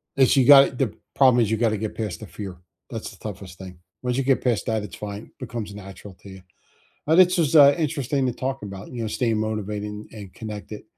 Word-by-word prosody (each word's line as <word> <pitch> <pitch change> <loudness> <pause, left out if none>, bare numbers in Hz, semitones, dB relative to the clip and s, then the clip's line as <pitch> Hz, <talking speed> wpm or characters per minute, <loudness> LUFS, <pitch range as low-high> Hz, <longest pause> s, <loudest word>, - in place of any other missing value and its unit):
this 135 0 +4
you 130 - +4
got 135 -3 +8
the 130 -6 0 0.2
problem 130 -3 +5
is 110 - -2
you 110 - +1
gotta 115 -1 +1
get 110 +1 -4
past 105 -6 -5
the - - -7
fear; 95 +2 -8 0.3
that's - - -6
the - - -16
toughest 95 -4 -8
thing. 95 -2 -10 0.2
Once 125 -1 -1
you 135 - +1
get 135 0 +2
past 120 -5 0
that, 110 -2 0
it's 105 - -8
fine, 105 +1 -7
becomes 115 -5 -6
natural 100 0 -10
to 100 - -12
you. 95 0 -11 0.7
Uh, 160 - +4
this 185 0 +5
was, 160 -1 +1
uh, 140 -1 +8
interesting 140 -4 -1
to - - 0
talk 135 0 -4
about, 100 -1 -8
you 120 -2 -5
know, 115 - -2
staying 115 -1 0
motivated 105 -1 -3
and 105 0 -8
and 100 -4 -10
connected, 105 -1 -8
110 Hz, 230 wpm, -23 LUFS, 105-130 Hz, 0.7 s, got